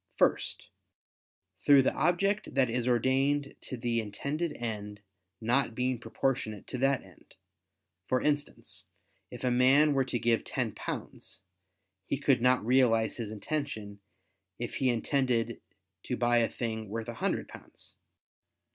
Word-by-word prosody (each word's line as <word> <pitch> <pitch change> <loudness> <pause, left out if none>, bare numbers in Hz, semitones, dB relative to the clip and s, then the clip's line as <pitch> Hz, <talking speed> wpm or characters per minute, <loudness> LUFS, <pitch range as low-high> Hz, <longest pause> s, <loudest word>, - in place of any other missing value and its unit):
First, - - +1 1.0
through 140 -2 +7
the - - +1
object 180 +4 +1
that 130 -3 +3
is 125 +1 -1
ordained 135 +4 +1
to 130 - -4
the 120 0 0
intended 140 +10 -3
end 105 -3 -5 0.4
not 120 +1 +1
being 125 0 0
proportionate 115 -3 -2
to 125 - -5
that 135 0 +2
end; - - -19 0.7
for 130 - +2
instance, 145 +1 -3 0.4
if - - -9
a 125 - +2
man 135 +5 +5
were 135 -1 +2
to 125 - -2
give 115 -1 +1
ten - - -1
pounds, - - -7 0.6
he - - -1
could 135 -3 +2
not 125 -2 +3
realize 115 -3 +3
his 115 -4 -4
intention, 110 -3 -4 0.6
if - - -5
he 130 - +2
intended 125 0 0 0.4
to - - -2
buy 120 +1 +3
a 115 -1 +3
thing 110 -3 -4
worth 115 +2 -4
a 120 - -4
hundred - - 0
pounds. - - -13
125 Hz, 140 wpm, -30 LUFS, 115-140 Hz, 1.0 s, through